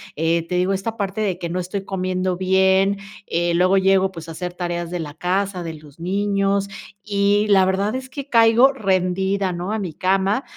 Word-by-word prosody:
eh, 165 +1 0
te 180 - -2
digo 185 +2 +1
esta 220 +4 -3
parte 200 0 -2
de 190 -4 -1
que 175 - -3
no 180 +2 -2
estoy 185 +2 -4
comiendo 185 -1 -1
bien, 190 +1 +3 0.3
eh, 170 0 0
luego 185 +2 +3
llego, 190 0 +3
pues, 165 -3 -9
a - - -6
hacer 180 +2 -5
tareas 175 -1 -4
de 180 - -3
la 150 -3 -6
casa, 185 +1 -1
de 165 -1 -5
los 150 -1 -15
niños, 200 +2 0 0.3
y 205 0 +1
la 190 -2 +5
verdad 195 +5 0
es 260 0 -5
que 280 +1 -7
caigo 230 +3 +5
rendida, 190 -2 0
¿no? 175 +3 -4
a 220 - -1
mi 180 -6 -4
cama, 195 - +1
190 Hz, 200 wpm, -21 LUFS, 180-200 Hz, 0.3 s, la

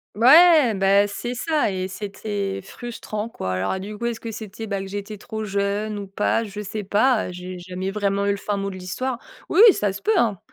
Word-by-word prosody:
Ouais, 290 - +7
bah 195 +1 +4
c'est 240 +4 -4
ça 295 -3 0
et 185 0 -3
c'était 200 0 -4
frustrant 225 0 -6
quoi. 95 - -4
Alors 95 - -1
du 205 +2 -7
coup, 235 - -4
est-ce 235 -1 -2
que 230 - -6
c'était 220 0 -7
bah, 200 -1 -2
que 195 - -5
j'étais 205 +2 -6
trop 220 0 -6
jeune 205 +1 -1
ou 200 - -5
pas? 210 +3 0
Je 210 0 -6
sais 210 +1 -5
pas, 215 +3 +2
heu, - - -6
j'ai 180 +1 -7
jamais 185 +2 -5
vraiment 200 0 0
eu - - +2
le 200 - +1
fin 205 0 -2
mot 195 0 -2
de 190 - -7
l'histoire. 235 +8 -3 0.3
Oui, - - +2
oui, 400 - +8
ça 205 -2 0
se 195 +1 -9
peut 220 - +2
hein, 215 -6 +2
205 Hz, 230 wpm, -23 LUFS, 195-225 Hz, 0.3 s, oui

